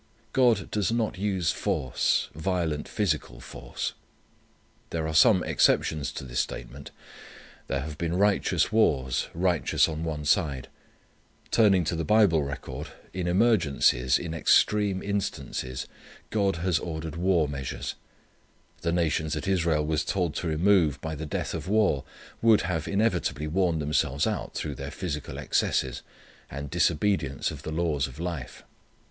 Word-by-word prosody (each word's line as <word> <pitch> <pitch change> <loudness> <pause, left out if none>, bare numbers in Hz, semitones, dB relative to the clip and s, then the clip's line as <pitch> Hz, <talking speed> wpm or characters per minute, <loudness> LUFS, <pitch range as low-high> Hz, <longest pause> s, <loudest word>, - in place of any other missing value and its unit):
God 120 -6 +3
does 105 0 0
not 115 -5 -1
use 95 -4 0
force, 65 -2 0
violent 80 -2 -2
physical 80 - -2
force. - - -5 1.0
There 80 -1 -2
are 80 - -3
some 90 +3 +6
exceptions 75 -4 +2
to - - -6
this 60 -2 -3
statement. 60 +3 -5 0.8
There 70 -1 -1
have 75 +1 -7
been 85 +1 -1
righteous 100 +1 +2
wars, 65 - +2
righteous 90 -1 +2
on 80 0 -4
one 75 -2 -3
side. 75 -5 +1 0.8
Turning 100 -5 +4
to 85 - -1
the 80 - -2
Bible 100 -3 +4
record, 70 -1 -5 0.3
in 90 -1 -2
emergencies, 85 - +3
in 85 -2 -5
extreme 100 +3 +3
instances 95 -10 -3 0.5
God 100 -3 +1
has 85 0 0
ordered 80 -2 -5
war 85 -2 +2
measures. 70 -2 -4 0.9
The 85 - 0
nations 80 -2 0
that - - -3
Israel 85 -5 +1
was 80 0 0
told 90 -6 -1
to 90 - -3
remove 80 -2 +3
by 80 -1 -4
the 80 +1 -5
death - - -3
of - - -5
war 100 -9 +2 0.4
would 115 -2 +5
have 85 -3 -2
inevitably 100 - 0
worn 85 +1 +1
themselves 75 -1 0
out - - -3
through 75 - -3
their 70 +1 -6
physical 75 -1 -5
excesses, 65 -2 0 0.5
and 70 +1 -6
disobedience 85 -3 +1
of - - -8
the 80 - -6
laws 80 -4 0
of 70 +3 -12
life. 85 -6 -5
80 Hz, 140 wpm, -27 LUFS, 75-95 Hz, 1.0 s, some